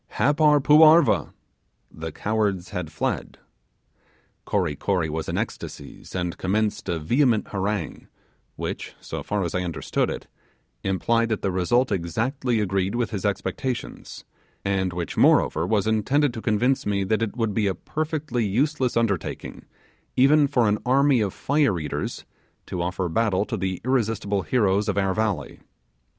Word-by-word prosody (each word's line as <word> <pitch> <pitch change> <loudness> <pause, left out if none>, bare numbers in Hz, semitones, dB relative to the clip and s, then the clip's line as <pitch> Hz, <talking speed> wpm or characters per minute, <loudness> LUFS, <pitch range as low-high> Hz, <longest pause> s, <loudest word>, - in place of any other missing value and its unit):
Happar 150 +1 +4
poo 150 +2 +6
arva!' 160 +2 +6 0.6
(the 80 0 -6
cowards 105 -2 -1
had 85 -3 -5
fled). 80 - -3 1.1
Kory 90 -8 0
Kory 85 -2 -1
was 80 +1 -3
in - - -2
ecstasies, - - -6
and 90 -1 -3
commenced 105 +1 -1
a 85 - 0
vehement 115 - +2
harangue, 100 -3 -3 0.5
which, - - -5
so - - -6
far 105 -1 -2
as 85 - -3
I 90 - 0
understood 85 -2 -1
it, - - -5 0.6
implied 115 +5 +1
that 110 - -2
the 95 - +1
result 120 +8 +1
exactly 115 - -1
agreed 95 0 0
with 120 0 -1
his 100 -3 -3
expectations, 125 +5 -4 0.4
and 95 -1 0
which, 85 -2 -5
moreover, - - +4
was 105 -3 +1
intended 120 +6 +2
to 115 - -6
convince 120 +6 +1
me 100 -1 0
that 110 +4 0
it 115 +1 -2
would 115 -3 0
be 105 0 +1
a 95 - 0
perfectly 155 -6 -2
useless 130 +4 0
undertaking, 100 -7 -2 0.5
even 145 +3 +5
for 120 -4 +2
an 105 0 +1
army 135 0 +3
of 100 -2 0
fire 140 - +1
eaters, 75 -2 -4 0.4
to 90 - -4
offer 90 +1 -2
battle 100 +2 +1
to 115 - -3
the 95 -3 -2
irresistible 110 -6 0
heroes 105 -2 +1
of 100 - -1
our 95 -1 +1
valley. 110 -1 -2
105 Hz, 150 wpm, -24 LUFS, 95-125 Hz, 1.1 s, poo